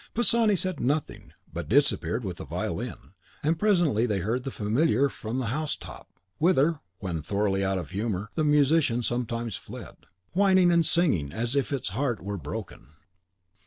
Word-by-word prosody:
Pisani 230 Hz, -2 st, +4 dB
said 185 Hz, -3 st, -1 dB
nothing, 145 Hz, +4 st, -2 dB, 0.2 s
but -, -, -5 dB
disappeared -, -, +2 dB
with -, -, -4 dB
the -, -, -6 dB
violin; -, -, -5 dB, 0.3 s
and 160 Hz, +2 st, +1 dB
presently 170 Hz, -, +3 dB
they 105 Hz, -3 st, 0 dB
heard 110 Hz, +7 st, -1 dB
the -, -, -1 dB
Familiar 125 Hz, +4 st, +2 dB
from 115 Hz, -1 st, -5 dB
the 130 Hz, -, -1 dB
house 155 Hz, +1 st, -1 dB
top -, -, -11 dB, 0.3 s
(whither, 165 Hz, -2 st, +3 dB, 0.2 s
when 90 Hz, -5 st, -3 dB
thoroughly 100 Hz, +3 st, 0 dB
out 95 Hz, 0 st, 0 dB
of 90 Hz, -3 st, -5 dB
humour, 105 Hz, 0 st, -2 dB
the 155 Hz, -, 0 dB
musician 145 Hz, -4 st, +3 dB
sometimes 115 Hz, -2 st, -2 dB
fled), -, -, -9 dB, 0.4 s
whining 185 Hz, -2 st, +5 dB
and 170 Hz, -2 st, +4 dB
sighing 115 Hz, -, +2 dB
as 120 Hz, +4 st, -2 dB
if 140 Hz, -1 st, 0 dB
its 130 Hz, -8 st, -1 dB
heart 120 Hz, +2 st, -1 dB
were 100 Hz, +1 st, -4 dB
broken. -, -, -7 dB
125 Hz, 165 wpm, -27 LUFS, 105-160 Hz, 0.4 s, whining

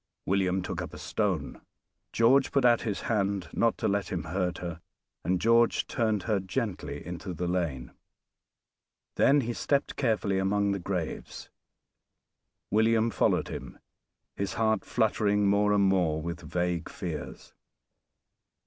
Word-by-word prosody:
William 95 Hz, -1 st, +1 dB
took -, -, -4 dB
up -, -, -7 dB
a -, -, -8 dB
stone. -, -, -2 dB, 0.5 s
George 130 Hz, +4 st, +4 dB
put 135 Hz, -3 st, +2 dB
out 120 Hz, -1 st, +5 dB
his 105 Hz, -4 st, -3 dB
hand 100 Hz, -6 st, -1 dB
not 115 Hz, -1 st, +2 dB
to -, -, -1 dB
let 100 Hz, -1 st, -1 dB
him 90 Hz, -, -2 dB
hurt 90 Hz, -2 st, -2 dB
her, 85 Hz, -2 st, -6 dB, 0.4 s
and 90 Hz, 0 st, +1 dB
George 115 Hz, +3 st, +3 dB
turned 110 Hz, -4 st, 0 dB
her 105 Hz, -3 st, +1 dB
gently 95 Hz, -, -4 dB
into 90 Hz, +2 st, -6 dB
the 90 Hz, +2 st, -2 dB
lane; 85 Hz, -9 st, -2 dB, 1.2 s
then 140 Hz, +1 st, +4 dB
he 120 Hz, -1 st, -3 dB
stepped 140 Hz, +4 st, 0 dB
carefully 105 Hz, -6 st, +1 dB
among 100 Hz, +1 st, +1 dB
the 100 Hz, -, -1 dB
graves. 90 Hz, -3 st, -5 dB, 1.2 s
William 110 Hz, +2 st, +3 dB
followed 95 Hz, -, +1 dB
him, -, -, -7 dB, 0.6 s
his 100 Hz, -1 st, -2 dB
heart 110 Hz, -2 st, +1 dB
fluttering 105 Hz, -3 st, +1 dB
more 100 Hz, +1 st, +3 dB
and 100 Hz, -1 st, +4 dB
more 90 Hz, -5 st, +2 dB
with 85 Hz, +2 st, -5 dB
vague 90 Hz, -1 st, -2 dB
fears. 80 Hz, -5 st, -7 dB
100 Hz, 140 wpm, -28 LUFS, 90-110 Hz, 1.2 s, out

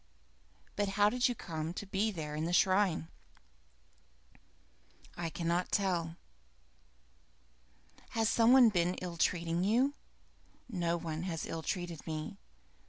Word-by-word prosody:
But, 205 Hz, -1 st, 0 dB
how 205 Hz, 0 st, +5 dB
did 250 Hz, +1 st, +2 dB
you 245 Hz, -, -2 dB
come 160 Hz, -3 st, -5 dB
to 205 Hz, -, -5 dB
be 195 Hz, +3 st, 0 dB
there 155 Hz, -7 st, -5 dB
by 155 Hz, -, -2 dB
the 170 Hz, +2 st, -1 dB
shrine?" 185 Hz, -3 st, +3 dB, 2.1 s
"I 170 Hz, -1 st, -3 dB
cannot 170 Hz, +2 st, -1 dB
tell." 175 Hz, -5 st, 0 dB, 2.0 s
"Has 225 Hz, -1 st, +3 dB
some 230 Hz, +1 st, +4 dB
one 255 Hz, -3 st, +8 dB
been 180 Hz, -2 st, +1 dB
ill 175 Hz, -2 st, -6 dB
treating 170 Hz, +1 st, +1 dB
you?" 245 Hz, +8 st, +3 dB, 0.7 s
"No 175 Hz, -6 st, -1 dB
one 160 Hz, -2 st, -4 dB
has 165 Hz, -2 st, -3 dB
ill 165 Hz, -, -4 dB
treated 175 Hz, -2 st, -4 dB
me. 160 Hz, +6 st, -5 dB
175 Hz, 125 wpm, -33 LUFS, 165-205 Hz, 2.1 s, one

